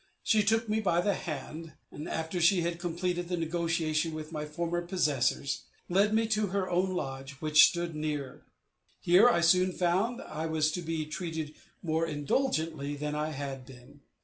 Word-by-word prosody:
She 215 - +4
took 225 +2 +2
me 215 +1 +1
by 175 -5 +2
the 200 +3 +2
hand, 160 -1 -6 0.3
after 160 +2 -3
she 175 +2 +5
had 170 0 -2
completed 175 0 -2
the 180 - -1
negotiation 165 -1 0
with 155 0 -7
my 150 -1 -4
former 170 +2 -2
possessors, 145 -6 0 0.2
and 175 - -5
led 205 +2 +4
me 225 +1 +2
to 215 -1 +1
her 195 0 -1
own 185 +1 0
lodge, 135 -3 -4
which 155 +2 +6
stood 170 -1 -3
near. 150 -3 -4 0.6
Here 185 +8 +6
I 170 - +2
soon 180 +2 +4
found 185 +8 +1
I 155 +1 -4
was 155 -1 +1
to 175 - -3
be 165 -2 -2
treated 160 -1 -4 0.3
more 165 0 0
indulgently 155 - -1
than 150 +1 -3
I 150 +1 -1
had 135 -3 -5
been. 130 +3 -15
165 Hz, 175 wpm, -30 LUFS, 150-180 Hz, 0.6 s, which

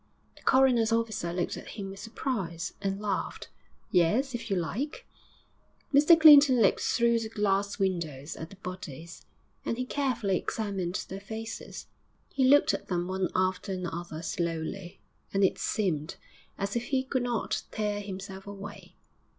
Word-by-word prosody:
The - - -18
coroner's 250 -4 +4
officer 225 -6 0
looked 175 0 -2
at - - -9
him 195 -2 -5
with 195 - -10
surprise, 190 -8 -3
and 195 0 -1
laughed. 205 -3 -3 0.4
'Yes, 220 +11 +3
if 230 -1 -5
you 195 - +1
like.' 255 - -3 0.9
Mr 305 +4 +7
Clinton 290 -5 +9
looked 200 -4 +4
through 235 -1 +3
the 225 -1 -4
glass 200 -2 0
windows 165 -7 -2
at 160 - -7
the 195 - -12
bodies, 170 -4 -8 0.4
and 230 - -2
he 255 - -2
carefully 240 -9 0
examined 195 -4 -3
their 190 - -6
faces; 220 +2 -7 0.4
he 270 - 0
looked 285 +3 +6
at - - -4
them 175 -1 -1
one 185 -1 -1
after 185 +1 0
another 170 -3 -5
slowly, 170 +2 -3 0.4
and 195 - +3
it 190 - +2
seemed 165 -7 -1 0.4
as 200 +2 -2
if 235 0 -1
he 265 0 0
could 260 -1 -1
not 240 -2 -1
tear 210 -1 -2
himself 195 0 -7
away. 200 0 -9
200 Hz, 150 wpm, -29 LUFS, 180-235 Hz, 0.9 s, Clinton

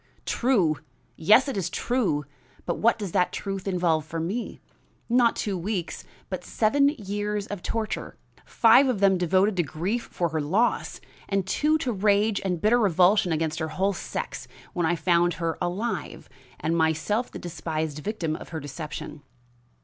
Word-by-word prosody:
"True! 195 - +2 0.4
yes, 215 - +5
it 275 - -3
is 185 -3 -1
true. 195 - 0 0.4
But - - -2
what 230 +1 +3
does 200 -5 -5
that 180 +1 +2
truth 195 -1 -4
involve 175 -4 +1
for 160 +2 -5
me? 195 +9 -3 0.5
Not 240 -1 +3
two 200 -2 -2
weeks, 185 -1 -3 0.2
but - - -5
seven 280 +6 +3
years 205 -5 -3
of 205 -3 -6
torture, 225 +2 -3 0.3
five 240 +4 +5
of 250 -6 0
them 195 -2 +4
devoted 185 +4 +2
to - - +4
grief 180 +9 -3
for 170 -1 -1
her, 160 0 -1
loss, 195 +12 0 0.3
and 195 -2 0
two 300 +10 +2
to 260 -5 -2
rage 205 0 +2
and 180 -3 -1
bitter 220 +7 +3
revulsion 185 -2 +4
against 160 0 -1
her 160 - -1
whole 195 +5 0
sex - - -5 0.3
when 175 -4 0
I 175 - +2
found 175 +1 +2
her 165 -2 -2
alive, 185 +7 -3 0.3
and 165 +1 0
myself 160 +9 +1
the - - -8
despised 160 -3 -4
victim 165 -3 -2
of - - -9
her 160 - -4
deception." 145 +1 -7
190 Hz, 165 wpm, -26 LUFS, 165-215 Hz, 0.5 s, yes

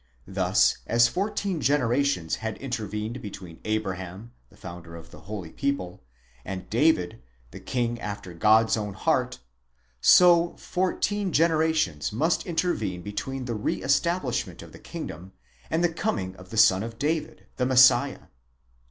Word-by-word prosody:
Thus, - - +2
as 115 0 +5
fourteen 195 - -2
generations 135 - +1
had 110 -1 -5
intervened 110 -2 -4
between 95 -6 -9
Abraham, 100 0 -4 0.2
the - - -21
founder 85 -2 -10
of 85 - -12
the - - -12
holy 95 -7 -6
people, 140 -11 -3 0.4
and 95 +2 -6
David 115 - +2 0.3
the - - -9
king 120 -1 -2
after 100 -3 -6
God's 110 +6 +4
own 105 -3 -4
heart, - - 0 0.6
so 175 -1 +6
fourteen 190 +2 -1
generations 160 - +1
must 155 +10 0
intervene 160 - -1
between 130 +6 -5
the 120 - -3
re 105 -1 -2
estab 170 +7 +1
lishment 125 -3 -4
of - - -13
the - - -13
kingdom 90 +4 -8 0.4
and 165 +2 0
the 170 -1 +2
coming 95 - -2
of 90 0 -14
the 110 - -6
son 95 -3 +6
of 115 +1 -6
David, 145 - -2
the 125 - +1
Messiah. 130 +1 +5
115 Hz, 145 wpm, -26 LUFS, 95-155 Hz, 0.6 s, so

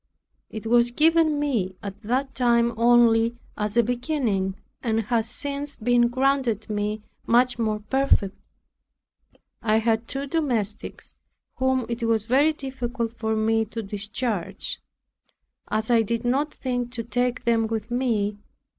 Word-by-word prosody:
It 220 0 -7
was 240 +1 +4
given 315 +3 +3
me 225 -11 -1
at 200 -1 -7
that 260 +5 -1
time 235 -2 +2
only 235 0 +4 0.2
as 210 +1 -1
a 235 - +6
beginning, 240 -6 -1 0.3
and 225 -2 +1
has 225 0 0
since 285 +2 -4
been 240 +1 +3
granted 255 -3 +1
me 210 +1 -2 0.2
much 245 +1 +3
more 215 -2 0
perfectly. 220 -4 +1 1.2
I 215 -1 +2
had 225 0 +1
two 275 +1 -3
domestics, 250 - -2 0.4
whom 260 -1 +1
it 235 0 -4
was 225 -2 +1
very 275 +6 +4
difficult 250 -5 -4
for 220 -1 0
me 220 +1 +2
to 225 +1 -6
discharge, 205 -1 -3 0.9
as 220 +2 -1
I 230 -1 +5
did 230 +2 -2
not 280 +5 +1
think 245 -2 -3
to 235 -2 -3
take 245 +2 -1
them 230 -1 +2
with 225 0 -4
me. 215 -5 0
235 Hz, 135 wpm, -25 LUFS, 220-255 Hz, 1.2 s, a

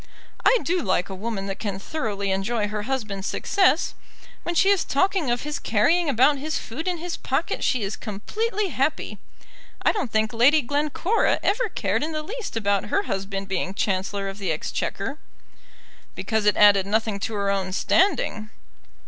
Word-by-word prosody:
"I - - +6
do 355 +1 +1
like 185 -3 0
a - - -5
woman 200 0 -4
that 195 -1 -5
can 200 -3 -3
thoroughly 200 -4 -3
enjoy 210 +3 0
her 210 0 -3
husband's 210 -7 -2
success. 370 -5 +2 0.5
When 345 - -3
she 385 +4 +4
is 400 -3 +3
talking 360 0 +1
of 240 0 0
his 300 0 -3
carrying 310 +10 +2
about 275 +3 +4
his 310 +3 -2
food 315 +10 -6
in 360 -1 0
his 345 +1 -4
pocket - - -2
she 250 -5 +1
is 195 +2 -2
completely 405 - -2
happy. 300 0 -1 0.6
I - - +5
don't 380 - -3
think 220 +1 +1
Lady 270 +6 +5
Glencora 300 - +1
ever 445 +3 +1
cared 215 - -1
in 315 +1 -2
the 310 0 -3
least 435 - -5
about 200 -3 +1
her 400 - 0
husband 195 - -3
being 190 0 -2
Chancellor 195 0 -1
of 195 +1 -6
the 190 -4 -1
Exchequer." 200 - -3 1.0
"Because 220 -2 -1
it 210 - +4
added 200 -2 +6
nothing 215 -1 0
to 215 +2 -3
her 200 -1 0
own 190 -1 -1
standing." 240 - +1
225 Hz, 175 wpm, -24 LUFS, 200-315 Hz, 1.0 s, I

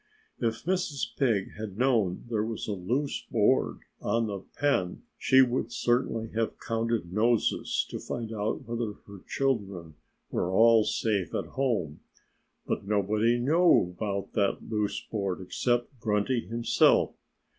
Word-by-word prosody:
If 115 -1 -1
Mrs. 175 -5 -1
Pig 110 -8 +1
had 105 -3 -6
known 115 -8 +1
there 110 -3 0
was 110 0 -4
a - - -2
loose 120 +10 -2
board 115 +4 +2 0.2
on 115 0 +1
the 100 -2 -4 0.2
pen 115 -12 0
she 130 0 +5
would 120 -2 -1
certainly 120 -2 0
have 115 0 -2
counted 115 -6 -2
noses 115 +2 +1
to - - -4
find 115 -2 -5
out 105 0 -2
whether 115 -2 -3
her 100 -1 -11
children 100 - -1 0.4
were 90 - 0
all 115 +2 +6
safe 100 -7 -1
at - - -1
home. 115 - -1 0.7
But - - -3
nobody 105 +3 +2
knew 140 - +3
about 100 -2 -3
that 100 -2 0
loose 105 -2 -1
board 100 -4 -3
except 120 +7 -1
Grunty 110 +3 0
himself. 115 +1 +3
110 Hz, 135 wpm, -28 LUFS, 100-120 Hz, 0.7 s, all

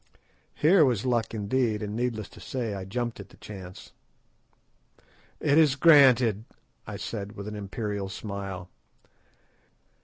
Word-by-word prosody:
Here 165 +3 +5
was 125 -5 +1
luck 120 -3 0
indeed, 110 0 0
and, 105 0 -4
needless 115 -3 -2
to - - -15
say, 120 -5 -4
I 95 -1 -5
jumped 120 +3 -3
at 100 0 -10
the - - -18
chance. 95 -3 -10 1.5
"It 145 +3 +3
is 150 -4 +4
granted," 130 - +5 0.4
I - - -5
said 105 -2 -5
with 100 +1 -8
an 105 - -5
imperial 100 -1 -4
smile. 95 -2 -6
110 Hz, 130 wpm, -27 LUFS, 100-125 Hz, 1.5 s, Here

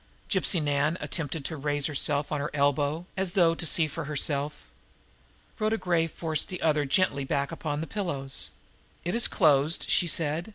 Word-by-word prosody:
Gypsy 190 -2 +3
Nan 145 +2 +1
attempted 150 -3 -4
to 160 - -3
raise 145 0 -1
herself 145 -1 0
on 150 - 0
her 150 - -2
elbow, 145 +3 +1
as 190 -2 -1
though 170 -4 +4
to 165 - -3
see 165 +1 +3
for 155 +1 -5
herself. 145 0 -2 0.9
Rhoda 215 +1 +1
Gray 170 -5 +1
forced 160 -1 -1
the 180 - -5
other 150 -2 +2
gently 140 -1 +1
back 140 +1 -1
upon 155 -2 -3
the - - -3
pillows. 135 - -3 0.6
"It 175 - -1
is 235 - +3
closed," 155 -2 +3
she 175 - +4
said. 160 +3 -1
155 Hz, 170 wpm, -28 LUFS, 145-170 Hz, 0.9 s, though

